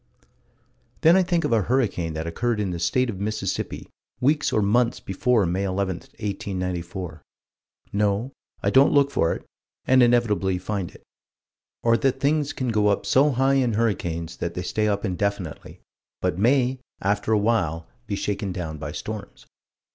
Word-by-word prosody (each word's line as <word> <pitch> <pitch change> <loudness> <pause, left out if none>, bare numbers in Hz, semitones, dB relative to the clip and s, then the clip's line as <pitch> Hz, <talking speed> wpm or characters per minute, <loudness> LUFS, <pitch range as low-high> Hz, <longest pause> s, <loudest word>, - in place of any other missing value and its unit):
Then 165 +2 +6
I 190 - +5
think 175 -2 +1
of - - +1
a 110 - +4
hurricane 100 -8 0
that 80 +1 -3
occurred 115 +7 -1
in 100 -3 -1
the 85 - -4
state 125 +10 +1
of 95 - -8
Mississippi 105 -1 -3 0.3
weeks 145 +4 +2
or 105 - +2
months 115 +4 +2
before 110 +2 +1
May 90 +3 -1
11, 95 -1 -1
1894. 90 -4 -5 0.7
No 105 +5 +1 0.3
I - - +2
don't 135 +2 +5
look 140 -1 +4
for 80 -10 +2
it - - -10 0.4
and 130 0 +5
inevitably 115 -6 +3
find 95 -1 -3
it. - - -17 0.8
Or 115 0 +4
that 135 +2 0
things 145 +1 +1
can 130 -2 -3
go 105 -2 +2
up 100 - +1
so 140 +3 +4
high 135 0 +2
in 120 -3 +1
hurricanes 85 -7 -1
that 85 - -4
they 90 - -3
stay 105 +4 0
up 100 0 0
indefinitely 95 -3 -3 0.4
but - - 0
may, 130 +3 +3 0.2
after 100 +2 0
a 110 - +5
while, 90 -7 0 0.2
be 100 - -2
shaken 100 0 -2
down 80 -4 -5
by - - -5
storms. - - -7
105 Hz, 165 wpm, -24 LUFS, 90-125 Hz, 0.8 s, Then